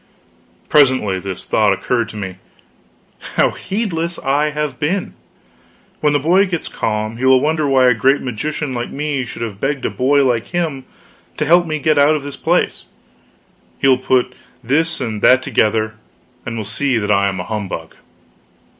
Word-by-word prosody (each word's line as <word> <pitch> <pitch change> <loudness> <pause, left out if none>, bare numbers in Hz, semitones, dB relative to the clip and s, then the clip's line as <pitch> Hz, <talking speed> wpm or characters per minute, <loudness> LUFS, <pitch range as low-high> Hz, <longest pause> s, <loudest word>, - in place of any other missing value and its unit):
Presently 130 -10 +3
this 95 -1 -7
thought 105 -2 +3
occurred 115 +4 -1
to - - -9
me: 95 -3 -6 1.0
how - - +3
heedless 175 -5 -3
I 145 +3 +1
have 150 -3 -3
been! 170 +6 -1 0.9
When 150 - +2
the 145 - +2
boy 180 +7 +3
gets 175 -3 -3
calm, 110 +1 -3
he 130 - -2
will 130 0 +6
wonder 155 +2 0
why 135 -2 +4
a 125 - +5
great 135 +5 +2
magician 135 +4 -4
like 120 -1 -3
me 140 -2 -2
should 120 - -6
have 105 -3 -6
begged 135 -1 -1
a - - -1
boy 140 +2 +2
like 120 -3 0
him 160 -7 -3 0.5
to - - 0
help 175 +1 +4
me 155 -1 -1
get 155 0 +2
out 145 +2 +5
of 150 - -3
this 145 -1 -6
place; - - 0 0.9
he - - +1
will 130 -1 +4
put 125 -1 +1 0.3
this 160 +7 0
and 110 -5 -4
that 130 0 +5
together, 110 -1 +1 0.5
and 115 -1 -4
will 110 - -3
see 135 +1 0
that 105 -1 -1
I 100 -1 +3
am 95 -1 -5
a - - -3
humbug. 95 -6 -5
130 Hz, 175 wpm, -18 LUFS, 110-150 Hz, 1.0 s, will